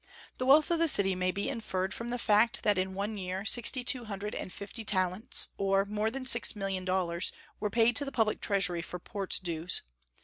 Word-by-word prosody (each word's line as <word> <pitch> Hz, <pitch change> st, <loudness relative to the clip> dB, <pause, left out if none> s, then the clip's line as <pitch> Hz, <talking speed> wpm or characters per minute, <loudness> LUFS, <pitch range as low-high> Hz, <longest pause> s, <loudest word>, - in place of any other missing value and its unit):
The 255 Hz, -, -1 dB
wealth 300 Hz, +4 st, +5 dB
of 335 Hz, -, +2 dB
the 330 Hz, -, +3 dB
city 195 Hz, -9 st, +6 dB
may 185 Hz, 0 st, -1 dB
be 200 Hz, +2 st, -2 dB
inferred 190 Hz, -7 st, -3 dB
from 235 Hz, +1 st, -6 dB
the 245 Hz, -, -2 dB
fact 220 Hz, 0 st, +2 dB
that 205 Hz, -3 st, +2 dB
in 190 Hz, 0 st, -2 dB
one 205 Hz, +2 st, -3 dB
year 185 Hz, +1 st, -4 dB
sixty 245 Hz, +3 st, +3 dB
two 245 Hz, -1 st, -1 dB
hundred 210 Hz, 0 st, -5 dB
and -, -, -5 dB
fifty 205 Hz, +4 st, -6 dB
talents, 185 Hz, 0 st, +1 dB
or 195 Hz, 0 st, +2 dB
more 210 Hz, +1 st, -1 dB
than 260 Hz, +2 st, -6 dB
six 235 Hz, -6 st, +2 dB
million 195 Hz, -2 st, -3 dB
dollars, 180 Hz, -2 st, 0 dB, 0.3 s
were 210 Hz, -, -1 dB
paid 230 Hz, +2 st, +3 dB
to 285 Hz, -, +1 dB
the 275 Hz, -, -5 dB
public 220 Hz, -4 st, 0 dB
treasury 180 Hz, -4 st, +1 dB
for 180 Hz, -, -7 dB
port 195 Hz, +2 st, -3 dB
dues. 170 Hz, 0 st, -2 dB
200 Hz, 210 wpm, -30 LUFS, 185-230 Hz, 0.3 s, city